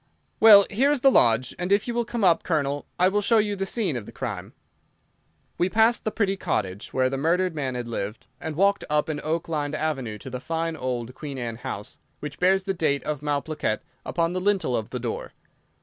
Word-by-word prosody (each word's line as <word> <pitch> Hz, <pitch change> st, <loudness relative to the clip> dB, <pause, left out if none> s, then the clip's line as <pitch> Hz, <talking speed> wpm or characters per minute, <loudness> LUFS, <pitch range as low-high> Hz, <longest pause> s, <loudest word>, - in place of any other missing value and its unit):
Well, 205 Hz, -3 st, +9 dB
here 260 Hz, +8 st, +3 dB
is 290 Hz, -3 st, +1 dB
the 270 Hz, -, +6 dB
lodge, 120 Hz, -, +4 dB
and 180 Hz, +1 st, -2 dB
if 200 Hz, +3 st, +3 dB
you 240 Hz, -, -2 dB
will 240 Hz, 0 st, 0 dB
come 235 Hz, -1 st, -3 dB
up, 175 Hz, -3 st, +5 dB
Colonel, 145 Hz, -4 st, -1 dB
I 180 Hz, -, +4 dB
will 205 Hz, +2 st, +1 dB
show 225 Hz, +3 st, +3 dB
you 210 Hz, -1 st, +1 dB
the 195 Hz, 0 st, -3 dB
scene 195 Hz, -, -1 dB
of 115 Hz, -4 st, -5 dB
the -, -, -9 dB
crime." -, -, -5 dB, 1.1 s
We 180 Hz, -, +2 dB
passed 225 Hz, +3 st, +3 dB
the 215 Hz, -, 0 dB
pretty 200 Hz, -3 st, 0 dB
cottage 100 Hz, -, -2 dB
where 130 Hz, -1 st, +2 dB
the 135 Hz, +1 st, -2 dB
murdered 175 Hz, +4 st, +1 dB
man 135 Hz, -5 st, -3 dB
had 120 Hz, -1 st, -4 dB
lived, 105 Hz, -2 st, -4 dB
and 160 Hz, +1 st, -5 dB
walked 200 Hz, +4 st, +3 dB
up 150 Hz, +1 st, +1 dB
an 150 Hz, -1 st, -3 dB
oak 160 Hz, +2 st, -1 dB
lined 150 Hz, -2 st, -2 dB
avenue 135 Hz, -9 st, -2 dB
to 130 Hz, -, -9 dB
the 125 Hz, -, -4 dB
fine 165 Hz, +3 st, -2 dB
old 125 Hz, -3 st, -3 dB
Queen 140 Hz, 0 st, -7 dB
Anne 115 Hz, -3 st, -4 dB
house, 105 Hz, -3 st, -7 dB, 0.2 s
which 150 Hz, -1 st, -7 dB
bears 190 Hz, +1 st, +3 dB
the 195 Hz, -, -1 dB
date 155 Hz, -5 st, 0 dB
of 150 Hz, -2 st, -3 dB
Malplaquet 150 Hz, -5 st, -1 dB, 0.2 s
upon 170 Hz, 0 st, -1 dB
the 185 Hz, -, -2 dB
lintel 190 Hz, -10 st, +1 dB
of 110 Hz, 0 st, -3 dB
the 125 Hz, -, -4 dB
door. 120 Hz, -1 st, -4 dB
155 Hz, 220 wpm, -25 LUFS, 130-195 Hz, 1.1 s, Well